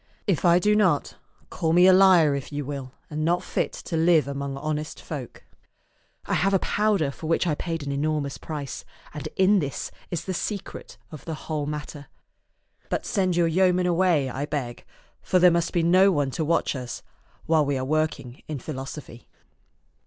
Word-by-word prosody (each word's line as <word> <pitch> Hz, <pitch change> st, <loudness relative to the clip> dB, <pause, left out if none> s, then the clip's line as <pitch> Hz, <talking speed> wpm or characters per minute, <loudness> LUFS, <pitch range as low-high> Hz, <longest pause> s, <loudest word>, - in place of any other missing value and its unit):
If 190 Hz, -7 st, 0 dB
I 170 Hz, 0 st, +6 dB
do 210 Hz, +4 st, +3 dB
not, 185 Hz, -9 st, +2 dB, 0.4 s
call 160 Hz, -1 st, 0 dB
me 180 Hz, +1 st, +6 dB
a 185 Hz, -, +7 dB
liar 185 Hz, -6 st, +6 dB
if 140 Hz, 0 st, -5 dB
you 145 Hz, -1 st, -4 dB
will 135 Hz, -2 st, -6 dB, 0.2 s
and 155 Hz, +1 st, -2 dB
not 175 Hz, +2 st, +1 dB
fit -, -, -1 dB
to 170 Hz, -, -6 dB
live 160 Hz, -3 st, +4 dB
among 140 Hz, -1 st, -4 dB
honest 155 Hz, +1 st, -4 dB
folk. 140 Hz, -6 st, -8 dB, 0.8 s
I -, -, -2 dB
have 195 Hz, +3 st, +2 dB
a 190 Hz, -, 0 dB
powder 205 Hz, -9 st, +1 dB
for 155 Hz, -, -8 dB
which 165 Hz, +2 st, +1 dB
I 165 Hz, -, +1 dB
paid 165 Hz, 0 st, -4 dB
an 140 Hz, -, -3 dB
enormous 145 Hz, 0 st, -2 dB
price, 145 Hz, -4 st, -6 dB, 0.3 s
and 150 Hz, -, -6 dB
in 190 Hz, +2 st, +4 dB
this 140 Hz, -4 st, -4 dB, 0.2 s
is 175 Hz, -, -4 dB
the 190 Hz, -, -3 dB
secret 200 Hz, +2 st, -5 dB
of 155 Hz, -, -10 dB
the 160 Hz, -, -4 dB
whole 150 Hz, -2 st, -2 dB
matter. 150 Hz, -1 st, -6 dB, 0.8 s
But -, -, -2 dB
send 185 Hz, -4 st, 0 dB
your 170 Hz, -1 st, +3 dB
yeoman 180 Hz, +1 st, +2 dB
away, 175 Hz, -5 st, +2 dB
I 135 Hz, +3 st, -4 dB
beg, 130 Hz, -6 st, -4 dB, 0.4 s
for 185 Hz, -, +1 dB
there 180 Hz, 0 st, +6 dB
must 170 Hz, 0 st, 0 dB
be 170 Hz, -, +1 dB
no 185 Hz, +4 st, +5 dB
one 145 Hz, -5 st, 0 dB
to 160 Hz, -, -2 dB
watch 165 Hz, -1 st, +1 dB
us 125 Hz, -2 st, -6 dB, 0.4 s
while 160 Hz, -1 st, +3 dB
we 140 Hz, -1 st, -1 dB
are 130 Hz, -, -2 dB
working 155 Hz, -4 st, -2 dB
in 155 Hz, -, -4 dB
philosophy." 135 Hz, -2 st, -8 dB
155 Hz, 185 wpm, -25 LUFS, 140-180 Hz, 0.8 s, a